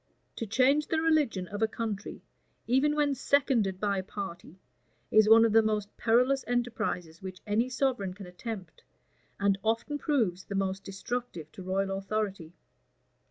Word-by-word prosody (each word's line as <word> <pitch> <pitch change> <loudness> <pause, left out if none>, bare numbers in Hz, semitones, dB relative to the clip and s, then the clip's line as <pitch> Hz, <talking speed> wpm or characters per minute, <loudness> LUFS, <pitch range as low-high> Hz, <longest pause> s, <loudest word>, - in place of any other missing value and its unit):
To 230 - -3
change 265 +7 +3
the 320 - +1
religion 300 - +1
of 205 +1 -5
a 220 - +4
country, 220 -2 -5 0.4
even 270 +5 +2
when 295 -2 +2
seconded 255 -8 +1
by 200 -1 0
a - - -4
party, 185 -3 -7 0.5
is 215 0 +6
one 225 +1 +8
of 225 - +2
the 225 +1 +6
most 215 -2 -2
perilous 250 +4 +2
enterprises 220 -9 -2
which 185 -1 -7
any 225 +4 +1
sovereign 250 -8 -1
can 200 -1 -9
attempt, 180 0 -8 0.6
and 200 -1 +2
often 230 +7 -1
proves 220 - 0
the 200 - -5
most 195 0 -1
destructive 195 -4 -5
to - - -10
royal 195 +1 -1
authority. 195 -5 -3
215 Hz, 155 wpm, -29 LUFS, 195-245 Hz, 0.6 s, one